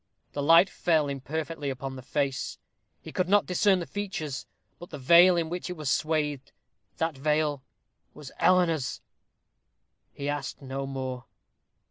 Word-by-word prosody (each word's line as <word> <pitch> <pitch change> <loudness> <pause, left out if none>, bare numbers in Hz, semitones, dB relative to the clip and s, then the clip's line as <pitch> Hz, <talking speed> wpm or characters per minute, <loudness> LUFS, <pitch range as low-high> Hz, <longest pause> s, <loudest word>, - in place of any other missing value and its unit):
The 145 - -3
light 165 +5 +7
fell 160 -4 +1
imperfectly 145 +2 -4
upon 135 0 -5
the 130 - -8
face; 135 +1 -2 0.5
he - - -9
could 185 0 -1
not 205 0 +4
discern 190 +2 +3
the 175 - -4
features, 170 -10 -5 0.3
but 175 - -10
the 150 - -7
veil 170 +6 +6
in 165 -1 0
which 175 +2 -5
it 180 - -5
was 150 -3 -1
swathed: 150 -4 -1 0.5
that 165 -2 -1
veil 150 0 0 0.5
was 140 -3 -10
Eleanor's! 170 -6 +2 1.1
He 140 - -6
asked 145 -1 -3
no 135 0 -5
more. 130 -2 -5
150 Hz, 145 wpm, -27 LUFS, 135-170 Hz, 1.1 s, light